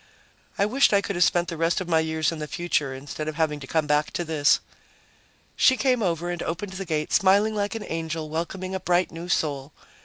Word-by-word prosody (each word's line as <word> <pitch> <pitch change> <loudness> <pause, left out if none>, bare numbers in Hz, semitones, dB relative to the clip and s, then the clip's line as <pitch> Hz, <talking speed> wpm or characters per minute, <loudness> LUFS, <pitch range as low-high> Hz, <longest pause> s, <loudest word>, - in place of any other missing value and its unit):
I 200 - +3
wished 255 +2 +3
I 200 - +5
could 200 - -4
have 175 - +4
spent 175 +1 +2
the 165 - -5
rest 165 +3 +1
of 185 - -5
my 165 -2 +3
years 160 -1 0
in 165 - -6
the 150 - -4
future, 150 -3 -1
instead 145 +3 -6
of 155 - -3
having 155 -2 0
to 135 - -9
come 160 +1 +1
back 150 0 +1
to 175 - -2
this. 155 -3 +3 1.0
She 260 - +4
came 255 -3 +2
over 175 -2 -1
and 175 -1 -4
opened 185 +4 -4
the 195 +1 -5
gate, 155 -3 -2
smiling 200 +3 +4
like 205 +1 -2
an 225 - -5
angel 160 -1 -3
welcoming 175 +4 -4
a 190 - -2
bright 180 0 +1
new 170 +2 -8
soul. 145 -3 -1
165 Hz, 225 wpm, -25 LUFS, 155-190 Hz, 1.0 s, I